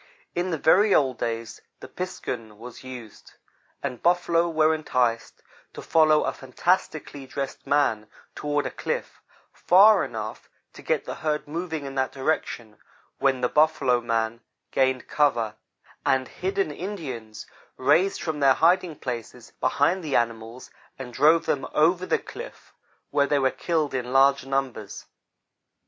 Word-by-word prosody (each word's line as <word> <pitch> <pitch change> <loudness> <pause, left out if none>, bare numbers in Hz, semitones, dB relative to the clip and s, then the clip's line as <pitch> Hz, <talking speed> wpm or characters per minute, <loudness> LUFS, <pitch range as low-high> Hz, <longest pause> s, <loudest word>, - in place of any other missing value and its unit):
In 175 +1 -1
the 165 - -1
very 195 +7 +4
old 130 -4 +2
days 115 -1 -4 0.2
the - - -9
"piskun" 115 - -6
was 120 +3 -11
used, 125 -5 -11 0.5
and 125 -4 -4
buffalo 170 -1 +2
were 160 -1 +3
enticed 125 -7 -1 0.3
to - - -7
follow 155 -2 +4
a - - -1
fantastically 145 0 -2
dressed 135 +1 -5
man 115 -7 +1 0.3
toward 145 0 -1
a - - -3
cliff, - - -4 0.3
far 200 +3 +6
enough 110 -2 -6 0.2
to - - -12
get - - -1
the - - -4
herd 150 -2 -1
moving 160 -1 -4
in 135 - -6
that 130 -1 -1
direction, 120 -6 -3 0.4
when 135 -2 +2
the 125 - +3
"buffalo 140 -4 +2
man" 115 0 -1 0.3
gained 130 -1 +1
cover, 120 -8 +1 0.5
and 130 -1 +1
hidden 190 -2 -2
Indians 135 - -6 0.3
raised 185 -1 +2
from 160 -2 -3
their 135 -2 +5
hiding 175 -1 +3
places 120 -3 -6
behind 185 0 +1
the 150 -4 -2
animals, 115 +1 -2 0.3
and 125 -2 -8
drove 160 +6 +4
them 135 -2 -1
over 175 +4 +3
the - - +2
cliff, - - -11 0.4
where 140 -1 +2
they 145 - +2
were 135 -1 +2
killed 155 -2 -1
in 125 -1 -3
large 135 0 +4
numbers. 135 -6 -3
140 Hz, 145 wpm, -25 LUFS, 125-160 Hz, 0.5 s, far